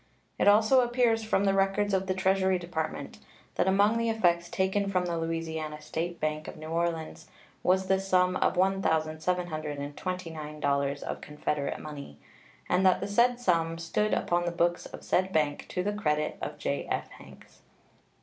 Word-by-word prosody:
It - - +3
also 220 +5 +6
appears 240 -2 +2
from 215 -2 +1
the 195 -1 +3
records 195 +1 +1
of 190 0 +1
the 185 - 0
Treasury 190 0 +2
Department 170 -2 -5 0.3
that - - +1
among 205 +4 +3
the 230 0 +1
effects 175 -6 +2
taken 195 +1 0
from 185 -2 +1
the 170 -1 -2
Louisiana 165 -2 -3
State 170 +3 -4
Bank 155 0 -2
of - - -8
New 155 0 -8
Orleans 165 -1 -2 0.3
was 190 +1 +2
the 190 0 +2
sum 185 -1 +2
of - - +1
$1,729 155 -4 -1
of - - -5
Confederate 150 -1 -3
money, 140 - -9 0.5
and 185 - +2
that 185 -1 +4
the - - -3
said 240 +4 +3
sum 165 -7 +1
stood 165 +6 0
upon 175 0 0
the 175 - 0
books 175 0 0
of - - -11
said 185 +1 +1
bank 150 -4 0
to 180 - -2
the 205 +2 -1
credit 150 -7 -1
of - - -5
J.F. - - -2
Hanks. - - -16
180 Hz, 160 wpm, -29 LUFS, 155-195 Hz, 0.5 s, also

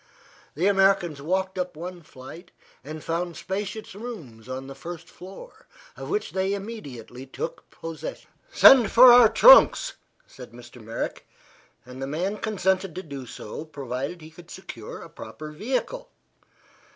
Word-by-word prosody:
The 165 +6 0
Americans 195 -6 +3
walked 190 +4 -2
up 180 -2 -3
one 175 +1 -7
flight 155 +4 -12 0.3
and 155 +3 -8
found 170 +1 -3
spacious 205 +2 -5
rooms 165 - -9
on 130 +1 -5
the 135 - -9
first 170 +4 -9
floor, 190 - -13 0.3
of - - -8
which 420 - -2
they 190 +1 -1
immediately 135 - -9
took 145 - -7
possession. 165 -1 -8 0.2
"Send 250 - +7
for 245 +1 +9
our 240 -2 +8
trunks," - - +7 0.3
said 125 -3 -13
Mr. 120 0 -13
Merrick; 115 +2 -5 0.6
and 125 +1 -10
the 135 - -3
man 180 +8 -2
consented 190 -4 -1
to 185 - -5
do 140 -5 -8
so 110 +5 -8
provided 140 +2 -6
he 155 +1 -12
could 170 +1 -15
secure - - -9
a - - -10
proper 155 0 -10
vehicle. 265 - -3
175 Hz, 145 wpm, -25 LUFS, 140-200 Hz, 0.6 s, for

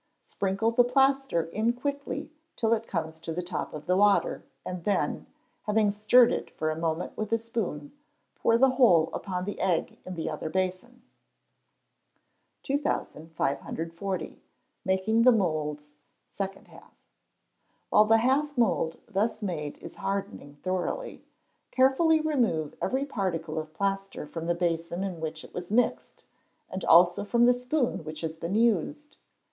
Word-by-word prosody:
Sprinkle 200 +4 -1
the 245 +1 +5
plaster 270 -6 +2
in 220 +6 +1
quickly 285 +4 -4 0.2
till 225 0 +2
it 225 0 -1
comes 160 -3 -3
to 165 0 -6
the 180 +2 -3
top 175 -2 -4
of 150 -1 -8
the 180 - +2
water, 205 +1 +3 0.2
and 180 -2 -5
then, 205 +1 0 0.4
having 210 -1 +3
stirred 215 +4 +5
it - - -3
for 155 0 -2
a - - -3
moment 165 +1 -2
with 215 0 -4
a 230 - +4
spoon, 220 -10 -4 0.4
pour 230 - +2
the 265 +2 +5
whole 185 -12 +4
upon 180 -2 -3
the 205 - -5
egg 180 -4 0
in 185 - -7
the 165 -1 -3
other 155 0 -4
basin. 190 +8 -3 1.6
2540. 165 - -3 0.4
Making 190 +4 +2
the 250 +2 +7
Moulds 155 -8 -1 0.4
Second 195 -1 -6
Half. - - -17 1.0
While 210 - +6
the 225 +1 +5
half 275 +5 +1
mould 195 -8 +1
thus 220 +1 -1
made 150 -7 -3
is - - -11
hardening 195 -7 -4
thoroughly, 185 - -3 0.4
carefully 270 +5 +4
remove 240 - 0
every 265 +2 0
particle 170 - -2
of 155 0 -8
plaster 195 -2 -2
from 165 +2 -6
the 170 - +1
basin 170 +1 -1
in 180 -4 -4
which 160 0 -4
it - - -14
was 175 0 -6
mixed, 235 +4 0 0.5
and 185 0 -4
also 175 +3 +6
from 235 +3 +3
the 245 - +6
spoon 250 - -1
which 155 0 -7
has 160 -1 -3
been 170 +4 -3
used. 235 - +1
195 Hz, 150 wpm, -28 LUFS, 165-235 Hz, 1.6 s, the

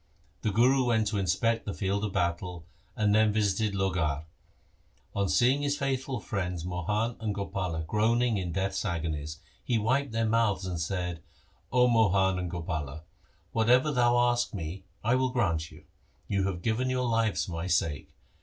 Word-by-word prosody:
The - - 0
Guru 125 +6 +4
went 110 -2 +2
to 105 -1 -1
inspect 110 +5 0
the 100 - -3
field 100 +1 -1
of 105 - -1
battle, 85 -1 -2 0.3
and 105 -1 +2
then 110 0 +4
visited 105 0 +1
Lohgarh. 85 -6 0 0.9
On 100 -1 +1
seeing 130 +4 +3
his 145 0 0
faithful 135 -2 -2
friends 90 -5 -3
Mohan 105 +7 -1
and 110 -2 -2
Gopala 90 -5 -3
groaning 115 +4 +2
in 90 -3 -3
death's 95 +1 -1
agonies, 80 -5 -3 0.3
he 120 - +1
wiped 130 +5 +1
their 115 0 0
mouths 110 -4 +1
and 90 -3 -3
said, 90 -1 -3 0.3
' - - -36
O 125 0 +5
Mohan 95 -5 +3
and 90 -1 -3
Gopala, 80 -4 -4 0.5
whatever 125 +6 +4
you 130 - -1
ask 120 -1 +3
me 90 +2 -6 0.2
I 115 +3 +2
will 130 0 +2
grant 85 -11 0
you. - - -15 0.4
You 100 -1 +1
have 90 -2 -4
given 120 +3 0
your 130 0 0
lives 115 -2 +1
for - - -8
my 85 +2 -3
sake. 80 -4 0
100 Hz, 170 wpm, -29 LUFS, 90-115 Hz, 0.9 s, O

